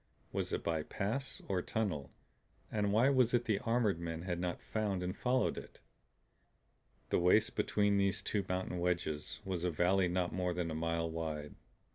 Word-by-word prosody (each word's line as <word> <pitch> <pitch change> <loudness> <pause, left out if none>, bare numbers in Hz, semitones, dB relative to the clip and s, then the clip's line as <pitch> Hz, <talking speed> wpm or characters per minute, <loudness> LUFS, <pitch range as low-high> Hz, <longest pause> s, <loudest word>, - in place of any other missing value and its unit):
Was - - -2
it - - -1
by 80 -2 0
pass 125 - -3
or 95 -2 0
tunnel; 90 - -2 0.6
and 105 -2 +1
why 115 +6 +5
was 125 -3 +4
it 120 0 +1
the 110 -3 +1
armored 115 -6 +1
men 85 -1 -4
had 90 -2 -2
not 90 -1 -2
found 100 -4 -1
and 90 +2 -2
followed 125 +3 +1
it? - - -13 1.3
The - - +4
waist 90 +5 +4
between 105 -1 +2
these 100 -1 +1
two 105 -2 0
mountain 90 -1 -1
wedges 85 -4 -1
was 90 -3 -2
a 90 - +2
valley 90 +3 +3
not 90 0 0
more 90 -1 -1
than 85 -2 -1
a - - -2
mile 85 +1 0
wide. 80 -2 -4
90 Hz, 175 wpm, -35 LUFS, 85-105 Hz, 1.3 s, why